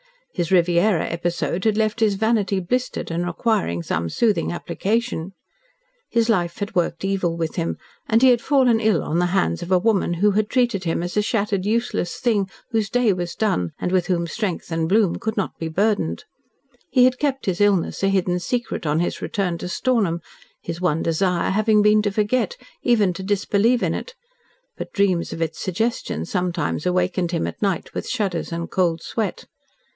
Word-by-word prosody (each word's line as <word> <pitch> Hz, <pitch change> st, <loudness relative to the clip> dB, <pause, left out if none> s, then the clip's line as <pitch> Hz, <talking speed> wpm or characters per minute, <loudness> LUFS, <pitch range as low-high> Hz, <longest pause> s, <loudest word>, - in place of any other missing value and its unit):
His 175 Hz, -3 st, -2 dB
Riviera 175 Hz, +1 st, +3 dB
episode 175 Hz, +2 st, -2 dB
had 215 Hz, -1 st, +2 dB
left 215 Hz, 0 st, 0 dB
his 215 Hz, -3 st, +3 dB
vanity 210 Hz, -2 st, +1 dB
blistered 250 Hz, +2 st, -2 dB
and 170 Hz, +1 st, -1 dB
requiring 175 Hz, -, 0 dB
some 85 Hz, 0 st, -2 dB
soothing 220 Hz, -, +1 dB
application. 195 Hz, +1 st, -2 dB, 0.8 s
His 230 Hz, -1 st, +2 dB
life 175 Hz, -6 st, +1 dB
had 205 Hz, +2 st, -4 dB
worked 175 Hz, +1 st, -1 dB
evil 185 Hz, -4 st, 0 dB
with 165 Hz, -2 st, -3 dB
him, 165 Hz, -1 st, -1 dB, 0.3 s
and 225 Hz, +3 st, +3 dB
he 260 Hz, -, +8 dB
had 240 Hz, -2 st, +4 dB
fallen 255 Hz, -5 st, +3 dB
ill 215 Hz, -7 st, +2 dB
on 165 Hz, -, -1 dB
the 180 Hz, -, +2 dB
hands 85 Hz, 0 st, 0 dB
of 175 Hz, -, -6 dB
a 185 Hz, -, +6 dB
woman 195 Hz, -3 st, +1 dB
who 205 Hz, +4 st, +3 dB
had 210 Hz, +1 st, 0 dB
treated 240 Hz, -7 st, +1 dB
him 165 Hz, 0 st, 0 dB
as 175 Hz, -, -4 dB
a -, -, +5 dB
shattered, 205 Hz, -3 st, -1 dB
useless 220 Hz, -5 st, -1 dB
thing 210 Hz, -5 st, +1 dB, 0.2 s
whose 220 Hz, -3 st, 0 dB
day 245 Hz, -4 st, +3 dB
was 175 Hz, -1 st, -4 dB
done 90 Hz, -, 0 dB
and 180 Hz, -, -2 dB
with 180 Hz, -2 st, +1 dB
whom 175 Hz, -2 st, 0 dB
strength 180 Hz, -1 st, -3 dB
and 165 Hz, 0 st, 0 dB
bloom 205 Hz, -3 st, +3 dB
could 220 Hz, 0 st, -3 dB
not 195 Hz, -, -2 dB
be 165 Hz, -, -3 dB
burdened. 170 Hz, -, 0 dB, 0.7 s
He 255 Hz, -2 st, +4 dB
had 255 Hz, 0 st, +3 dB
kept 275 Hz, -2 st, -1 dB
his 185 Hz, 0 st, -1 dB
illness 200 Hz, -4 st, +2 dB
a 195 Hz, -, +2 dB
hidden 185 Hz, -2 st, +1 dB
secret, 235 Hz, -2 st, -3 dB
on 150 Hz, +3 st, +2 dB
his 175 Hz, -, -2 dB
return 180 Hz, -4 st, -2 dB
to -, -, -5 dB
Stornham, 195 Hz, -6 st, 0 dB, 0.4 s
his 170 Hz, +1 st, -5 dB
one 165 Hz, -3 st, +1 dB
desire 175 Hz, +2 st, +1 dB
having 215 Hz, +1 st, +3 dB
been 210 Hz, 0 st, +5 dB
to 205 Hz, -, 0 dB
forget 220 Hz, -, 0 dB, 0.3 s
even 215 Hz, -7 st, +3 dB
to 175 Hz, -, -7 dB
disbelieve 205 Hz, +4 st, +1 dB
in -, -, +1 dB
it, 485 Hz, -, -6 dB, 0.6 s
but -, -, -7 dB
dreams 195 Hz, -5 st, +1 dB
of 165 Hz, -, -6 dB
its 160 Hz, -, -4 dB
suggestion 190 Hz, -, -2 dB
sometimes 175 Hz, -, -2 dB
awakened 180 Hz, -1 st, 0 dB
him 170 Hz, -, -1 dB
at -, -, -6 dB
night 195 Hz, -5 st, -1 dB
with -, -, -4 dB
shudders 195 Hz, -10 st, -2 dB
and 170 Hz, 0 st, -4 dB
cold 170 Hz, -3 st, +1 dB
sweat. 220 Hz, -3 st, -3 dB
195 Hz, 190 wpm, -22 LUFS, 170-220 Hz, 0.8 s, he